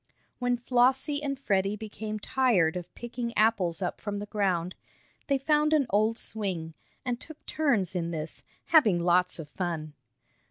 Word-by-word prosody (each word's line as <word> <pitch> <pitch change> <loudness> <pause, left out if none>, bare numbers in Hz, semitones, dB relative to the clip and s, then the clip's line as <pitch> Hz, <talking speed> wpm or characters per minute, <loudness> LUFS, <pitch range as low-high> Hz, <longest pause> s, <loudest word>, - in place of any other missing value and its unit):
When 245 0 +1
Flossie 260 +4 +2
and 275 -2 -2
Freddie 195 -5 +1
became 215 0 -5
tired 210 -8 +2
of 180 -1 -6
picking 240 0 -5
apples 200 -5 +2
up 180 - -3
from 205 -1 -3
the 205 - -4
ground, 185 -4 0 0.5
they 275 - +3
found 300 +3 +2
an 295 -3 +4
old 215 +3 +2
swing, 185 -9 -3 0.3
and 245 -1 -1
took 315 -1 -11
turns 240 - +1
in 170 -2 -2
this, 160 -1 -5 0.2
having 220 - +5
lots 180 +1 +3
of 160 -3 -7
fun. 160 -3 -4
210 Hz, 155 wpm, -28 LUFS, 180-250 Hz, 0.5 s, having